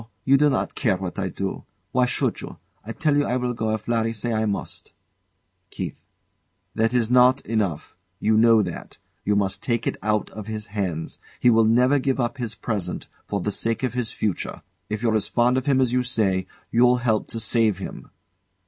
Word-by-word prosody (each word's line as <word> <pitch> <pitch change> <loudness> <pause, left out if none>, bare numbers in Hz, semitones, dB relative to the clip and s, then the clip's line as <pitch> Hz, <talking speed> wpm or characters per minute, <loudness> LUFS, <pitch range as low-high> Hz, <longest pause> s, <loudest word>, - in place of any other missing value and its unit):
No; 115 - -15 0.2
you 135 - +5
do 150 +2 +4
not 130 - -1
care 110 -8 +1
what 95 +1 -5
I 95 -1 -1
do. 95 +2 -4 0.3
Why 125 0 +3
should - - 0
you? - - -9 0.3
I 110 - -6
tell 150 +4 +1
you 145 - +3
I 125 - 0
will 125 -1 -1
go 110 -2 -2
if 110 - -9
Larry 115 -1 +1
say 115 +2 -2
I 110 0 +1
must. 100 - -4 0.8
KEITH. - - -6 0.7
That's 115 +1 +1
not 125 +1 +5
enough. 100 -9 -2 0.2
You 110 0 +2
know 115 -1 +5
that. 90 -3 -7 0.3
You 105 - +1
must 100 -2 0
take 115 -2 -1
it - - -1
out 105 0 0
of 110 -1 -8
his 110 -1 -5
hands. 90 -6 -3 0.2
He 125 - +5
will 115 -1 +5
never 125 +5 +4
give 135 0 0
up 120 +3 -1
his 115 -3 -3
present 100 -6 -3 0.2
for 100 -2 -2
the 105 - -1
sake 115 +5 -1
of 125 -3 0
his 125 -2 -2
future. 105 -5 -3 0.3
If 105 +1 -3
you're 115 -2 +2
as 110 -2 +1
fond 120 +1 +2
of 130 +2 -1
him 135 -2 +3
as 125 -2 +2
you 125 - +3
say, 100 -7 0 0.2
you'll 125 +1 +5
help 110 -3 +1
to 115 - -5
save 110 -3 +2
him. 95 - -8
115 Hz, 205 wpm, -24 LUFS, 105-125 Hz, 0.8 s, you